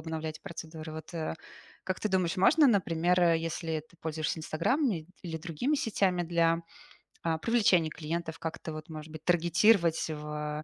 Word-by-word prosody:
обновлять 160 Hz, -1 st, -5 dB
процедуры. 160 Hz, -1 st, -7 dB
Вот, 160 Hz, +2 st, -8 dB
э, 160 Hz, -1 st, -2 dB, 0.5 s
как 185 Hz, -, -2 dB
ты 215 Hz, -, 0 dB
думаешь, 185 Hz, -2 st, +1 dB
можно, 295 Hz, -, +6 dB
например, 180 Hz, -5 st, +2 dB
э, 170 Hz, -2 st, +4 dB
если 165 Hz, -1 st, -3 dB
ты -, -, -22 dB
пользуешься 160 Hz, 0 st, -2 dB
"Инстаграмами" 170 Hz, -, 0 dB, 0.2 s
или 165 Hz, -3 st, -4 dB
другими 170 Hz, -, -1 dB
сетями 195 Hz, -8 st, +1 dB
для, 165 Hz, 0 st, +2 dB, 0.6 s
а, 165 Hz, -1 st, +1 dB
привлечения 195 Hz, -6 st, +3 dB
клиентов, 165 Hz, +1 st, -4 dB
как-то 160 Hz, 0 st, -5 dB
вот, 155 Hz, +1 st, -8 dB
может 155 Hz, 0 st, -8 dB
быть, 155 Hz, -1 st, -9 dB
таргетировать 170 Hz, 0 st, +3 dB
в, 150 Hz, 0 st, -4 dB
165 Hz, 150 wpm, -30 LUFS, 155-180 Hz, 0.6 s, можно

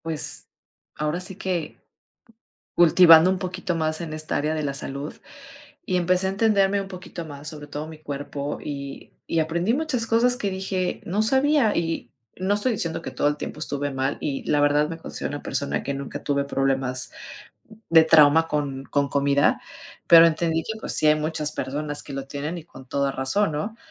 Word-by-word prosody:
Pues, 160 Hz, -2 st, +4 dB, 0.5 s
ahora 150 Hz, +3 st, -2 dB
sí 185 Hz, +1 st, -2 dB
que 180 Hz, -5 st, -3 dB, 1.0 s
cultivando 170 Hz, 0 st, +7 dB
un 190 Hz, -, +1 dB
poquito 185 Hz, -1 st, -4 dB
más 155 Hz, 0 st, -1 dB
en 160 Hz, -2 st, -6 dB
esta 155 Hz, 0 st, -2 dB
área 155 Hz, +2 st, -1 dB
de 155 Hz, -, -2 dB
la 140 Hz, -1 st, -2 dB
salud, 140 Hz, +1 st, -5 dB, 0.7 s
y 185 Hz, -, 0 dB
empecé 180 Hz, +1 st, +1 dB
a -, -, +1 dB
entenderme 200 Hz, -1 st, +2 dB
un 195 Hz, -, -6 dB
poquito 180 Hz, -2 st, -8 dB
más, 145 Hz, -1 st, -7 dB
sobre 150 Hz, -1 st, -8 dB
todo 145 Hz, +1 st, -6 dB
mi 160 Hz, -1 st, -11 dB
cuerpo, 145 Hz, -1 st, -5 dB
y 140 Hz, -2 st, -7 dB, 0.2 s
y 165 Hz, -, +1 dB
aprendí 170 Hz, +7 st, 0 dB
muchas 270 Hz, -6 st, 0 dB
cosas 240 Hz, +2 st, +3 dB
que 205 Hz, -5 st, -2 dB
dije: 190 Hz, -1 st, -3 dB
"No 195 Hz, +4 st, -1 dB
sabía", 265 Hz, 0 st, +3 dB
y 165 Hz, -1 st, -3 dB, 0.2 s
no 190 Hz, +2 st, 0 dB
estoy 220 Hz, +5 st, +1 dB
diciendo 165 Hz, -7 st, -2 dB
que -, -, -6 dB
todo -, -, -1 dB
el 145 Hz, -, -1 dB
tiempo -, -, -6 dB
estuve 145 Hz, -2 st, -3 dB
mal 135 Hz, +1 st, -2 dB
y, 140 Hz, -2 st, -3 dB
la 145 Hz, -1 st, +2 dB
verdad, 145 Hz, +1 st, +3 dB
me 165 Hz, -, -6 dB
considero -, -, -5 dB
una 145 Hz, -, -6 dB
persona 140 Hz, -, -2 dB
que 140 Hz, -, -3 dB
nunca 140 Hz, 0 st, -6 dB
tuve 140 Hz, -1 st, 0 dB
problemas 135 Hz, -2 st, -1 dB, 0.8 s
de 165 Hz, -1 st, +8 dB
trauma 160 Hz, 0 st, +5 dB
con 140 Hz, -3 st, -3 dB
con 140 Hz, -1 st, 0 dB
comida, 140 Hz, +1 st, +2 dB, 0.5 s
pero 165 Hz, 0 st, +9 dB
entendí 165 Hz, 0 st, 0 dB
que, 220 Hz, 0 st, -5 dB
pues, -, -, -1 dB
sí -, -, +3 dB
hay 150 Hz, -, +6 dB
muchas 155 Hz, -1 st, -1 dB
personas 145 Hz, +2 st, -3 dB
que -, -, -10 dB
lo 135 Hz, 0 st, -5 dB
tienen 145 Hz, +5 st, -5 dB
y 160 Hz, -, -11 dB
con 130 Hz, -5 st, -14 dB
toda 140 Hz, 0 st, 0 dB
razón, 145 Hz, +9 st, 0 dB
¿no? 180 Hz, +10 st, -4 dB
155 Hz, 190 wpm, -24 LUFS, 145-185 Hz, 1.0 s, pero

